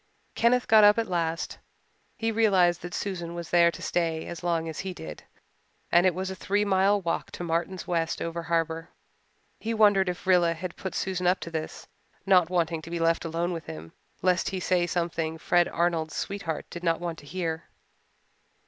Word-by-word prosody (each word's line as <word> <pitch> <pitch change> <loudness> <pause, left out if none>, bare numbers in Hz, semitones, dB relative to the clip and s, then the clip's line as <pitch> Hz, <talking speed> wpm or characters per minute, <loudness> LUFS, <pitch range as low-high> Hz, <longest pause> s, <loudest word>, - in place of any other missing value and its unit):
Kenneth 245 +2 +2
got 220 -1 +7
up 205 +1 +7
at 230 - +1
last. 165 -2 -2 0.6
He 225 -2 0
realized 190 -6 +3
that 175 +1 -6
Susan 175 -4 -4
was 170 -1 -7
there 170 -1 +6
to - - -8
stay 165 -2 -1
as 170 - -7
long 165 -2 0
as 160 - -6
he 185 -1 -4
did, 80 -1 -8 0.7
and 175 +2 +5
it 180 - +1
was 190 +1 -3
a - - -5
three 205 +2 0
mile 200 +1 +3
walk 170 -3 -2
to - - -5
Martin 170 +3 -1
West's 165 -2 -1
over 170 0 -3
harbour. 165 -1 -1 0.7
He 225 +1 -2
wondered 205 -3 +4
if 180 - -5
Rilla 175 -3 +4
had 170 +1 -6
put 190 - -6
Susan 185 -1 -1
up 180 +2 +3
to 170 - -6
this, 160 -1 -5 0.4
not 180 -4 +5
wanting 170 -3 0
to 165 - -10
be 170 - -3
left 165 0 +1
alone 170 +2 -1
with 165 - -6
him, 80 +1 -8 0.3
lest 180 -1 +2
he 190 - -3
say 180 -1 +1
something 165 -2 -2
Fred 175 +1 +2
Arnold's 165 -2 -1
sweetheart 180 -6 -3
did 175 - -7
not 165 -1 +1
want 170 -2 -4
to 145 - -15
hear. 165 -1 -3
175 Hz, 195 wpm, -27 LUFS, 165-190 Hz, 0.7 s, got